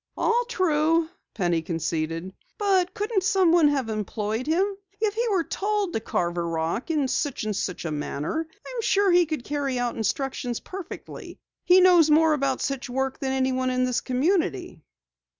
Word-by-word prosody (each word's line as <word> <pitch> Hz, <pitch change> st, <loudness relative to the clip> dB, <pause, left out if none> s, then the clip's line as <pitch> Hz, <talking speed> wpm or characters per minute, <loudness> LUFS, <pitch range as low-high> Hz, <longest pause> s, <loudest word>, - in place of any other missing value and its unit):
"All 480 Hz, +1 st, +2 dB
true," 330 Hz, -4 st, +2 dB, 0.3 s
Penny 175 Hz, -5 st, +1 dB
conceded, 165 Hz, +1 st, -3 dB, 0.2 s
"but 380 Hz, -4 st, +2 dB
couldn't 420 Hz, -1 st, 0 dB
someone 360 Hz, -5 st, +4 dB
have 275 Hz, -5 st, 0 dB
employed 215 Hz, +3 st, -3 dB
him? 340 Hz, +5 st, +3 dB, 0.3 s
If 430 Hz, -2 st, +1 dB
he 470 Hz, +2 st, -1 dB
were 380 Hz, -5 st, +2 dB
told 405 Hz, 0 st, -1 dB
to -, -, 0 dB
carve 175 Hz, -4 st, -2 dB
a -, -, +1 dB
rock 165 Hz, -, -2 dB
in 300 Hz, -4 st, +1 dB
such 280 Hz, -1 st, -1 dB
and 215 Hz, -1 st, -2 dB
such 180 Hz, -4 st, -3 dB
a 160 Hz, -, -2 dB
manner, 150 Hz, -, -3 dB, 0.2 s
I'm -, -, -4 dB
sure 400 Hz, -3 st, +3 dB
he 350 Hz, -1 st, +4 dB
could 310 Hz, -5 st, -3 dB
carry 280 Hz, -2 st, -2 dB
out 245 Hz, -1 st, -1 dB
instructions 245 Hz, +1 st, -2 dB
perfectly. 375 Hz, -2 st, -9 dB, 0.3 s
He 365 Hz, +1 st, +6 dB
knows 350 Hz, -4 st, +6 dB
more 315 Hz, +1 st, +5 dB
about 275 Hz, -3 st, 0 dB
such 275 Hz, -2 st, -3 dB
work 265 Hz, +1 st, -2 dB
than 265 Hz, -1 st, -2 dB
anyone 260 Hz, -1 st, 0 dB
in 255 Hz, 0 st, +1 dB
this 250 Hz, -1 st, 0 dB
community." 265 Hz, -, -1 dB
275 Hz, 170 wpm, -25 LUFS, 220-360 Hz, 0.3 s, He